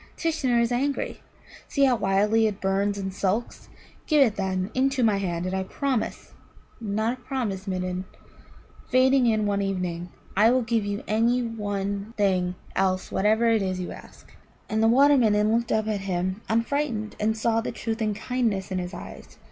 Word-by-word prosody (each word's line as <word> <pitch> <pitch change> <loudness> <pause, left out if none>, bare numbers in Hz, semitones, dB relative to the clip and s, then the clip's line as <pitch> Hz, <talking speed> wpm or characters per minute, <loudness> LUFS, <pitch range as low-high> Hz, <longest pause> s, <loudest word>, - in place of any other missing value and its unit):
Tishnar 275 -7 +1
is 235 +1 +1
angry. 275 +3 -1 0.5
See 280 - +1
how 255 -2 +4
wildly 210 +2 +2
it 205 -2 -4
burns 195 +1 0
and 190 -1 -4
sulks. 205 +4 -2 0.4
Give 300 -3 +5
it, 220 -4 -1
then, 190 0 -2
into 265 0 +1
my 215 -3 +3
hand, 175 -3 -2
and 185 - -3
I 190 - 0
promise 260 +5 -3 0.5
not 220 +3 -1
a - - -24
promise, 220 -8 -3
Midden, 185 0 -2 0.8
fading 260 0 +4
in 215 -2 +2
one 200 -1 0
evening 180 -3 -3 0.3
I 210 +4 +5
will 255 +1 +3
give 225 -2 0
you 205 +1 -3
any 235 +3 +2
one 205 -1 -3
thing 185 -3 +1 0.2
else 185 -1 0
whatsoever 220 +4 +2
it 225 -2 +3
is 185 -1 -2
you 180 - -4
ask." - - -13 0.3
And 220 0 0
the 225 - +5
Water 280 +5 +6
midden 215 -2 +3
looked 235 0 -1
up 220 0 +1
at 210 -2 -1
him 185 +1 -2
unfrightened, 230 -1 -1
and 220 +1 0
saw 225 +1 +1
the - - -4
truth 225 0 -4
and 215 -2 0
kindness 215 -5 -1
in 185 - -1
his 180 0 -5
eyes. - - -10
215 Hz, 180 wpm, -25 LUFS, 195-235 Hz, 0.8 s, Water